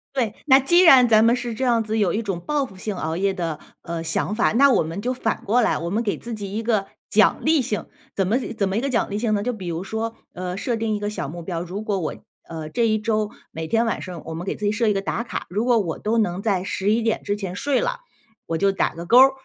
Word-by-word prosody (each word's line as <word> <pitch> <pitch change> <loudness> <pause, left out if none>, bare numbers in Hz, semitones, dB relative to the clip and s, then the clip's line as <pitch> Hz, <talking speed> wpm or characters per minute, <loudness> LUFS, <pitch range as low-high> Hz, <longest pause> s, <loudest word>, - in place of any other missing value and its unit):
对， 235 -6 0
那 270 -2 +6
既 345 +7 +4
然 265 -9 +8
咱 220 0 +6
们 235 +1 +5
是 240 -1 -4
这 260 +4 -2
样 235 -2 +3
子 220 +1 -1
有 195 -5 +2
一 220 - 0
种 195 -5 -3
报 290 +9 -1
复 195 -7 -14
性 205 +1 -4
熬 160 -2 -3
夜 195 +1 +1
的， 165 -4 -3 0.2
呃， 170 -1 -4
想 165 +4 -1
法， 220 - +2
那 275 +4 +6
我 - - +4
们 165 +5 -4
就 250 - -1
反 230 -3 -2
过 225 +5 +3
来， - - +2
我 170 +2 -4
们 210 +5 0
给 215 -4 -1
自 235 - -7
己 200 -2 -5
一 225 - -2
个 215 -4 +1 0.2
奖 - - +4
励 315 -2 +3
性。 215 -4 -3 0.3
怎 195 - +1
么 215 +6 +2 0.2
怎 200 -2 +1
么 195 - -1
一 - - +1
个 275 - -1
奖 240 -3 0
励 205 +1 -2
性 220 -1 0
呢， 205 -1 0
就 250 - 0
比 200 -7 -7
如 170 +1 -3
说， 220 +3 -3 0.2
呃， 180 0 -5
设 230 +4 -2
定 220 -1 -1
一 - - -3
个 205 - -1
小 180 -8 -4
目 170 +4 -7
标。 170 -1 -3
如 180 +4 -5
果 205 -3 -1
我， 165 - -3 0.3
呃， 160 -2 -6
这 235 +6 +1
一 215 -1 +2
周， 215 -1 0 0.2
每 160 0 -5
天 230 +6 +2
晚 225 - -1
上 180 -3 -7
我 165 - -6
们 165 +2 -5
给 - - -1
自 - - -10
己 205 - +2
设 225 +2 0
一 210 - +3
个 195 - -1
打 200 - -2
卡， 235 - -5
如 210 +6 -1
果 245 -2 +4
我 170 -6 -3
都 220 +2 0
能 195 -4 0
在 195 -4 0
11 205 +4 0
点 225 -1 0
之 205 - -1
前 195 -3 -5
睡 280 +8 0
了， - - -2 0.5
我 165 - -2
就 195 +3 +3
打 195 - 0
个 170 +1 -7
勾 240 +8 +6
儿。 265 +1 +8
210 Hz, 305 characters per minute, -23 LUFS, 185-230 Hz, 0.5 s, 然